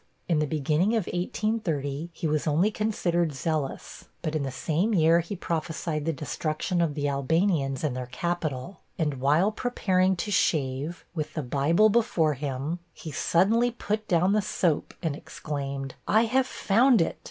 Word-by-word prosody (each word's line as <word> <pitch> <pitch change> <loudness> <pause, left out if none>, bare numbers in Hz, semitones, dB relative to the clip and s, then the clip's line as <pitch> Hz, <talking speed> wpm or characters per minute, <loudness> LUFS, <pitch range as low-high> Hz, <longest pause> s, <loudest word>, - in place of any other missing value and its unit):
In 165 -4 +2
the 150 - +1
beginning 155 +8 +1
of 220 -6 0
1830, 170 -6 -2
he 165 - -6
was 155 +1 0
only 165 +8 +3
considered 175 -7 0
zealous; 155 -1 -3 0.2
but 155 -2 -2
in 155 - 0
the 135 - -2
same 165 - 0
year 165 0 +5
he 175 +4 -4
prophesied 160 -3 -3
the 165 - +1
destruction 155 +4 -2
of 160 -4 0
the 145 -1 -1
Albanians 140 0 +1
and 145 -5 0
their 125 -1 -4
capital, 155 +2 -3 0.2
and 150 -7 -1
while 155 +9 +3
preparing 190 -5 +1
to 195 +4 -3
shave, 150 -2 0
with 155 -3 -4
the 155 - -2
Bible 145 - +3
before 200 -9 +2
him, 140 +4 -3 0.2
he 160 - -8
suddenly 210 - +3
put 215 -2 -3
down 180 +3 +3
the 215 - +3
soap 175 -5 0
and 160 -4 0
exclaimed, 140 -3 -5
'I 220 +3 +4
have 260 +3 +2
found 240 +3 +3
it! 165 - 0
165 Hz, 165 wpm, -27 LUFS, 145-190 Hz, 0.2 s, year